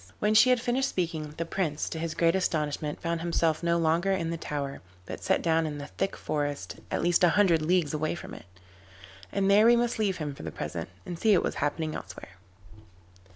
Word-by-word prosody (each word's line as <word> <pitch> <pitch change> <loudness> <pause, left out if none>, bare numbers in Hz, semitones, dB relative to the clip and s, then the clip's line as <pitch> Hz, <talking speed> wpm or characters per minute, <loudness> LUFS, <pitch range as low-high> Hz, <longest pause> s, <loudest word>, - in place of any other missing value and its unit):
When 210 +1 +1
she 220 +4 +7
had 250 -1 +4
finished 250 +3 0
speaking, 160 -4 -3
the 165 - -2
Prince, 165 -4 -2
to 160 - -5
his 165 -1 -3
great 165 -1 +3
astonishment, 150 -5 -1
found 170 -1 -2
himself 165 -2 +1
no 170 0 +2
longer 170 +3 +2
in 170 -4 -1
the - - -2
tower, 145 -3 -4 0.2
but - - -7
set - - +1
down 165 -1 +2
in 150 -1 -5
a 145 - -6
thick 195 - -3
forest 145 -1 -3
at - - -1
least 175 +1 +3
a 175 - +7
hundred 175 -6 +4
leagues 165 -1 +1
away 155 +2 -1
from - - -9
it. - - -10 0.9
And 195 -1 +1
there 205 +3 +6
we 240 - +7
must 235 -1 0
leave 200 -4 +1
him 150 -3 -4
for - - -11
the 80 - -5
present, 80 +3 -5 0.2
and 175 -2 -6
see 215 -4 +4
what - - +1
was - - -1
happening 155 +2 -1
elsewhere. 95 - -9
165 Hz, 215 wpm, -28 LUFS, 150-190 Hz, 0.9 s, she